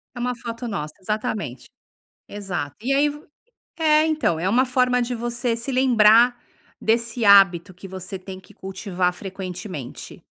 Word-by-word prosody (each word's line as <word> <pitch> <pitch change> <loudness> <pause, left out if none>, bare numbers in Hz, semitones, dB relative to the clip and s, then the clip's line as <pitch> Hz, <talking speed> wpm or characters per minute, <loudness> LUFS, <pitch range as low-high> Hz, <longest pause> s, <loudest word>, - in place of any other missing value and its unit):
É - - -7
uma 250 +1 -1
foto 235 0 -6
nossa, 150 -7 -4
exatamente. 210 - -3 0.6
Exato. 180 -9 -5
E 265 +4 0
aí 290 +2 +3
v 295 +1 -9 0.6
é, 310 0 +4
então, 300 - 0
é 185 - 0
uma 250 +5 +3
forma 250 -1 +2
de 245 +1 -3
você 240 0 -2
se 235 +4 -5
lembrar 245 -2 +5 0.4
desse 230 0 0
hábito 195 -2 +6
que 190 +2 -11
você 190 0 -7
tem 185 0 -9
que - - -20
cultivar 185 -2 -2
frequentemente. 185 - -8
220 Hz, 150 wpm, -23 LUFS, 185-245 Hz, 0.6 s, hábito